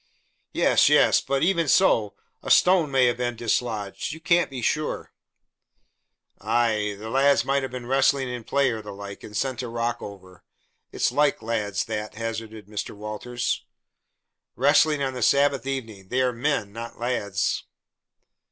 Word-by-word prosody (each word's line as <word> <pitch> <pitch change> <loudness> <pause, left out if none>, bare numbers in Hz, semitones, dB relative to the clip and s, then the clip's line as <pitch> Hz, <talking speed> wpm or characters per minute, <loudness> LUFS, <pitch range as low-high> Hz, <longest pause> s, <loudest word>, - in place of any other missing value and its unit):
"Yes, - - +4
yes. - - +5
But 140 0 -1
even 170 -2 +2
so, 115 - +3 0.3
a - - -7
stone 180 -4 +5
may 135 -2 +3
have 120 -1 +1
been 120 -1 -2
dislodged. 115 0 -2
You 160 - -9
can't 170 +2 +2
be 130 -3 -6
sure." 150 +6 -2 1.3
"Ay, 110 -3 0
the 110 +2 -7
lads 140 +2 +3
might 140 +1 +1
have 130 -2 -5
been 125 -1 -6
wrestling 135 +1 +2
in 125 -1 -5
play 135 +2 +1
or 110 -1 -4
the 105 -1 -9
like 100 0 -9
and 105 -1 -7
sent 130 -2 -1
a 125 - -5
rock 115 0 -2
over; 95 -3 -11 0.5
it's - - 0
like 145 +3 +1
lads, 105 -3 -1
that," 105 -1 -5
hazarded 110 -1 -5
Mr. 105 0 -6
Walters. 105 +4 -3 0.9
"Wrestling 145 +2 +3
on 135 -1 -2
the 125 - -6
Sabbath 140 +1 +2
evening! 110 -8 -5
They 125 +5 0
are 125 -1 +1
men, 115 -5 -1
not 115 +1 -8
lads." 110 -5 -1
120 Hz, 160 wpm, -25 LUFS, 110-135 Hz, 1.3 s, yes